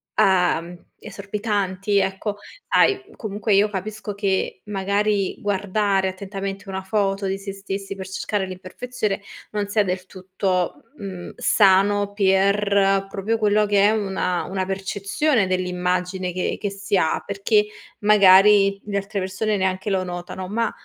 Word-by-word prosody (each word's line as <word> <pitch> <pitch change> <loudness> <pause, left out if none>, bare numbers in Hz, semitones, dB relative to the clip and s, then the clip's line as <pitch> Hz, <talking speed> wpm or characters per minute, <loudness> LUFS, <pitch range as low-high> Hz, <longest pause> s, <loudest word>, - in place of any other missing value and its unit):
uhm, 180 -2 +2 0.2
esorbitanti, 200 -1 -2
ecco. 195 +2 -1 0.3
Sai, 395 -1 +3
comunque 205 -1 -1
io 205 +2 +4
capisco 205 +1 -5
che 195 -1 -1
magari 200 0 0
guardare 200 -1 0
attentamente 195 +1 -6
una 190 0 -4
foto 195 0 0
di 195 0 -2
sé 195 0 -6
stessi 195 0 -5
per 190 -2 -7
cercare 195 +1 -2
l'imperfezione 195 +4 -4 0.3
non 205 -1 -2
sia 210 +1 +2
del 185 -1 -3
tutto, 185 -1 -2
mhmm, 190 -4 -7
sano 200 0 +3
per, 195 0 +2
proprio 210 +4 -2
quello 210 0 +3
che 205 -1 +3
è - - +4
una 190 -4 -1
una 190 0 -3
percezione 195 +5 0
dell'immagine 180 0 -1
che 180 0 -2
che 205 - -2
si 200 +1 -2
ha, 160 - +1
perché 205 +2 +2 0.3
magari 200 -1 +6
le 200 -1 -2
altre 200 +1 -3
persone 200 +3 -1
neanche 190 +1 -1
lo 190 -2 +1
notano. 180 +1 -6
Ma, 225 +2 -1
195 Hz, 135 wpm, -22 LUFS, 190-205 Hz, 0.3 s, magari